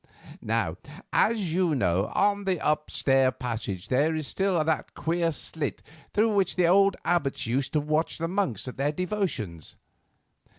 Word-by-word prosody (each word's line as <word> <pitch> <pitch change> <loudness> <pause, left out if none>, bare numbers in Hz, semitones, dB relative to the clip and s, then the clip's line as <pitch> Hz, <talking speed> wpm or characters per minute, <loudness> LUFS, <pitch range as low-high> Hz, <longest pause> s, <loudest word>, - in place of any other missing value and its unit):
"Now, - - -1 0.4
as 210 -8 +2
you 175 -3 +2
know, 95 -5 +1
on 200 0 +2
the 185 -3 0
upstair 135 -3 +2
passage 110 -6 -5
there 155 +5 +2
still 190 +4 0
is 155 - +1
that 160 -2 -1
queer 165 +2 0
slit 155 -1 -3 0.3
through 215 +1 +2
which 195 -3 +1
the 180 - +3
old 195 +2 +5
abbots 170 -6 0
used 130 +4 -1
to 155 - +3
watch 155 +2 -1
the 165 - -2
monks 180 - -1
at 125 - -7
their 140 +2 +1
devotions. 155 - -3
160 Hz, 155 wpm, -27 LUFS, 135-185 Hz, 0.4 s, old